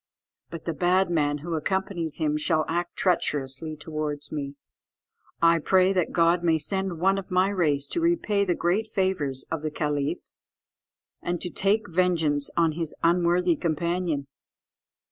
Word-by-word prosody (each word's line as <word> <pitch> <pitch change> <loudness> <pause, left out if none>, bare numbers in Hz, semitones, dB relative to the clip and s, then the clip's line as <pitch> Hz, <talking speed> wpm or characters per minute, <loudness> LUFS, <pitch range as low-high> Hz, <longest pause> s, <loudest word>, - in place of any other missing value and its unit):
But 165 -2 -8
the 165 - -1
bad 180 +2 +2
man 145 -3 +1
who 170 - -3
accompanies 170 0 -2
him 150 -2 0
shall 155 +1 +1
act 175 +1 -2
treacherously 155 -4 0
towards 150 -1 -5
me. 140 -2 -4 0.9
I 165 0 +5
pray 185 +4 +3
that 180 -3 0
God 170 +1 +3
may 165 -2 +3
send 190 +3 -2
one 195 +3 +3
of 190 - -9
my 185 +1 +3
race 155 -8 +1
to 340 - -1
repay 325 -12 +2
the 180 -3 0
great 195 +6 0
favours 185 -10 -1
of 165 -2 -2
the 155 - -2
caliph, 150 -2 -2 0.9
and 175 0 -2
to 180 - -4
take 205 +2 +1
vengeance 165 -5 +1
on 165 -1 +4
his 160 0 -4
unworthy 175 0 +3
companion. 170 -1 -1
170 Hz, 150 wpm, -26 LUFS, 155-185 Hz, 0.9 s, I